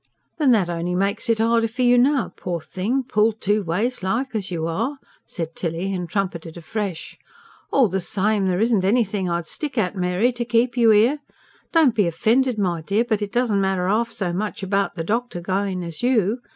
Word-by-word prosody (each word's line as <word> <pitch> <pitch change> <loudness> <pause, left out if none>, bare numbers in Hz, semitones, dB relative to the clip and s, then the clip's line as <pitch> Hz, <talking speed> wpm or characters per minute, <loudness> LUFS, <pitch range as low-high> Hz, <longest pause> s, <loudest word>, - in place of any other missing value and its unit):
"Then 295 -3 +3
that 215 -7 +4
only 175 +1 -2
makes 200 +5 -1
it 230 - +3
harder 230 +1 +2
for 240 +3 -3
you 245 0 +5
now, 260 +1 +2
poor 175 -2 -4
thing, 205 +11 -2
pulled 220 -2 +1
two 205 +2 +1
ways 205 +9 -1
like, 235 +8 -1
as 210 -4 -2
you 165 -3 -3
are," 230 - -2 0.3
said 165 -1 -5
Tilly, 175 +3 -3
and 180 -2 -4
trumpeted 180 -5 -3
afresh. 185 +1 -5 0.5
"All 265 -4 +4
the 190 0 -1
same, 200 +2 0
there 180 -1 0
isn't 220 -3 +2
anything 200 -3 +1
I'd 170 -1 -1
stick 285 - -5
at, 205 -3 0
Mary, 185 +6 +1
to 240 0 -3
keep 240 +1 +1
you 235 -2 +4
here. 225 +7 +4 0.5
Don't 315 -7 +4
be 210 -5 +2
offended, 235 +8 +1
my 175 -5 0
dear, 200 +7 +1
but 220 -3 0
it 205 -1 -3
doesn't 230 -4 +1
matter 190 -2 0
half 230 +4 +1
so 185 -6 -3
much 205 +2 -3
about 195 -1 0
the 165 - -3
doctor 225 +1 -2
going 185 +1 -2
as 170 -2 -6
you. 240 -2 +2
205 Hz, 200 wpm, -22 LUFS, 180-235 Hz, 0.5 s, you